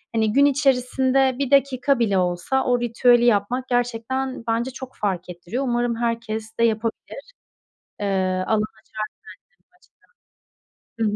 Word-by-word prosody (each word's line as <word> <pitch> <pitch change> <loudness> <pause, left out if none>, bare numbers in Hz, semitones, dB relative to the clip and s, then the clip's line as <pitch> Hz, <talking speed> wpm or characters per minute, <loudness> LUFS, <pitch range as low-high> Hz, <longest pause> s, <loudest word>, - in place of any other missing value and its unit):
hani, 220 -1 +1
gün 280 +3 +5
içerisinde 265 -1 +2
1 280 -1 -1
dakika 275 -1 +3
bile 205 -4 +2
olsa 180 +9 0
o 245 -1 +2
ritüeli 240 0 +3
yapmak 240 +3 +1
gerçekten 245 +1 -2
bence 230 +3 0
çok 260 0 -9
fark 190 -4 -3
ettiriyor. 175 +9 -4
Umarım 240 -2 0
herkes 230 -1 -3
de - - +3
yapabilir. 225 0 -1 0.8
Eee, 185 -2 0
alan 220 -1 +2
açar 215 +1 -8 2.1
bence 220 -2 +2
235 Hz, 125 wpm, -22 LUFS, 215-260 Hz, 2.1 s, gün